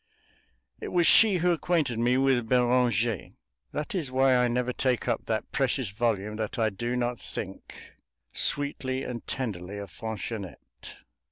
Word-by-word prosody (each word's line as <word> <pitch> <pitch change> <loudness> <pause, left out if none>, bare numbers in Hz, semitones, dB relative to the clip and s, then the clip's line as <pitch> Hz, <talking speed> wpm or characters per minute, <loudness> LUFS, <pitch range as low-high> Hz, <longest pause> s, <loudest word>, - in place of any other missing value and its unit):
It - - -6
was 175 -1 +2
she 215 +2 +7
who 175 +1 +2
acquainted 160 -8 0
me 120 +2 +3
with 130 -4 +2
Beranger; 120 -4 +2 0.4
that 150 - -4
is 160 -9 -2
why 130 0 +4
I 125 0 +3
never 125 +1 -1
take 130 -1 0
up - - -1
that 110 -1 -2
precious 130 -4 0
volume 105 -1 -1
that 110 -1 -3
I 110 -2 +2
do 120 +5 -3
not 120 -1 -1
think, 95 0 -7 0.6
sweetly 135 -2 0
and 120 -1 -6
tenderly, 100 -6 -4
of 100 -3 -7
Fanchonette. 110 -3 -7
125 Hz, 150 wpm, -27 LUFS, 110-130 Hz, 0.6 s, she